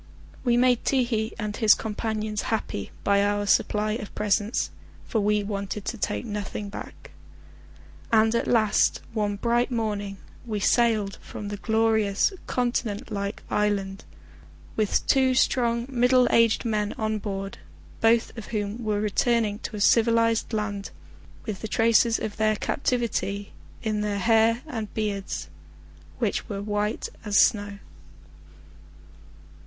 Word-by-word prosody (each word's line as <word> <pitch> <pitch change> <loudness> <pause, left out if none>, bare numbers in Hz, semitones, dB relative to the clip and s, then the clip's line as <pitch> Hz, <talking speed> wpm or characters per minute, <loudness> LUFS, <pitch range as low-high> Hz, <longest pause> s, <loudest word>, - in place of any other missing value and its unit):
We 240 -1 +3
made 250 -1 +3
Ti 265 -2 +2
hi 225 -2 -2
and 210 -2 -3
his 220 -1 +5
companions 215 -1 -3
happy 215 - -2
by 200 0 +3
our 205 0 0
supply 210 +1 +2
of 215 -2 -5
presents, 210 +2 0 0.3
for 220 - 0
we 210 0 +2
wanted 200 0 -4
to - - -2
take 245 - -2
nothing 205 -1 -4
back, - - -10 1.0
and 220 0 +4
at 235 - 0
last 220 -3 +3
one 210 -2 0
bright 235 +4 +1
morning 210 -4 -2 0.3
we 215 -3 -3
sailed 215 -2 +2
from 205 - -7
the 205 - -4
glorious 220 - +2
continent 240 -2 -1
like 200 0 -4
island, 200 -2 0 0.7
with 215 -2 +1
two 260 -1 +3
strong 235 -2 +2
middle 250 -1 +4
aged 230 0 +3
men 210 -2 0
on 215 -1 -2
board, 195 -1 -5 0.4
both 225 +1 +3
of 225 - -8
whom 210 +1 -3
were 210 -1 0
returning 215 0 +1
to 235 - -6
a - - -4
civilised 230 +1 +3
land 210 -2 -3 0.6
with 205 -3 -5
the 220 - -3
traces 230 +1 +3
of 210 - -5
their 215 0 +2
captivity 215 -4 -1 0.3
in 215 -2 -1
their 205 -1 -1
hair 225 +3 +3
and 225 -9 -5
beards, 200 - -3 0.7
which - - -1
were 200 - -3
as - - -7
white 210 +1 -1 0.2
as 205 -2 +1
snow. 205 -2 +2
215 Hz, 140 wpm, -26 LUFS, 205-230 Hz, 1.0 s, his